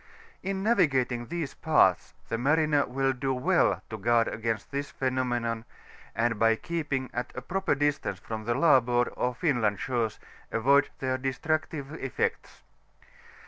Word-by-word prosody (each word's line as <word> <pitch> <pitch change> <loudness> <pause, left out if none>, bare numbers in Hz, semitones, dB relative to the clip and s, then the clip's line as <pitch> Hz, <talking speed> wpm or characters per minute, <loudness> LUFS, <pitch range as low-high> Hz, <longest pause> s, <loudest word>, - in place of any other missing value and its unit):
In 195 0 -3
navigatmg 135 - +2
these 170 -4 -3
parts, 125 - +2
we - - -2
mariner 150 +3 +2
will 135 +1 0
do 135 +1 -1
well 125 - +2
to 110 - -4
guard 115 +2 +3
aeauist 110 0 -3
tiiis 140 +1 -3
phenomenon, 120 -3 -1 0.5
and 115 0 0
by 115 0 +4
keeping 145 -3 -3
at 120 - -3
a 125 - -4
proper 190 0 0
distance 145 -8 0
from 110 +2 -6
the 120 +1 0
larboajrd 125 -5 +3
or 125 0 -1
FinLmd 120 - +1
shores, 115 -2 -2 0.3
avoid 140 +5 +3
their 130 -1 -1
destructive 145 +3 -2
eflects. 135 - -3
130 Hz, 140 wpm, -28 LUFS, 120-145 Hz, 0.5 s, by